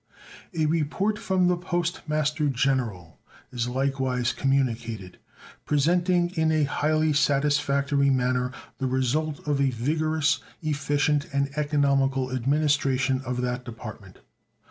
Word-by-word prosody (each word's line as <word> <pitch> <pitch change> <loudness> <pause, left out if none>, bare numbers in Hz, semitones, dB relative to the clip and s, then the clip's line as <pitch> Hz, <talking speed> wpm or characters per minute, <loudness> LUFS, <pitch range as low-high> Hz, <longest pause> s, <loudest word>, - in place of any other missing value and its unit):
A 160 -2 +1
report 165 +7 0
from 185 -1 +1
the 180 - +3
Post 175 -1 -2
Master 150 0 0
General 120 - -1 0.3
is 120 -2 -2
likewise 130 -1 0
communicated, 115 -8 -1 0.4
presenting 175 +4 +2
in 160 -3 +1
a 155 -1 +2
highly 155 +2 +1
satisfactory 140 -1 +2
manner 125 -1 +1 0.3
the 135 - 0
result 140 +4 -1
of 145 -2 +1
a 135 - +3
vigorous, 155 +5 0 0.2
efficient, 145 0 0
and 140 0 -1
economical 140 -3 +1
administration 135 -1 +1
of 125 0 -2
that 125 0 -2
Department. 115 -3 -9
140 Hz, 115 wpm, -26 LUFS, 130-155 Hz, 0.4 s, the